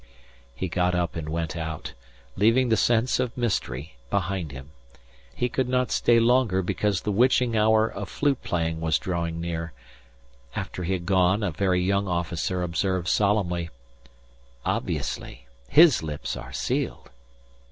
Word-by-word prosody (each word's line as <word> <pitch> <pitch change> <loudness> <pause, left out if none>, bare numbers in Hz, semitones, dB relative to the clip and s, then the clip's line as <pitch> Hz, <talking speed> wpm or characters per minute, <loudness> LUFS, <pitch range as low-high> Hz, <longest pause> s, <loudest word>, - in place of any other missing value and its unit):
He 95 - -3
got 90 +1 +1
up 85 -2 -1
and 80 -2 -4
went 80 0 -3
out, 80 -2 -5 0.4
leaving 115 +6 +3
the 110 - +4
sense 120 +2 +2
of 125 -1 -2
mystery 75 - -2
behind 95 -5 -1
him. 70 +1 -10 0.6
He 125 - 0
could 125 +1 -1
not 125 0 +1
stay 120 -1 +4
longer 115 -5 +3
because 100 +2 0
the 105 - -2
witching 120 +2 +3
hour 110 +1 +4
of 100 -3 -6
flute 140 +2 0
playing 80 -2 -1
was 80 -3 +2
drawing 85 -2 -3
near. 85 -1 -4 0.8
After 90 - -4
he 95 - 0
had 90 -2 -3
gone 95 +2 +3
a 95 - 0
very 90 +2 +1
young 100 +1 +1
officer 90 +1 -1
observed 90 +1 -1
solemnly: 90 -5 +1 1.0
"Obviously! - - -3 0.2
His 160 -2 +7
lips 75 -2 -4
are - - -8
sealed." - - -3
95 Hz, 145 wpm, -25 LUFS, 85-110 Hz, 1.0 s, His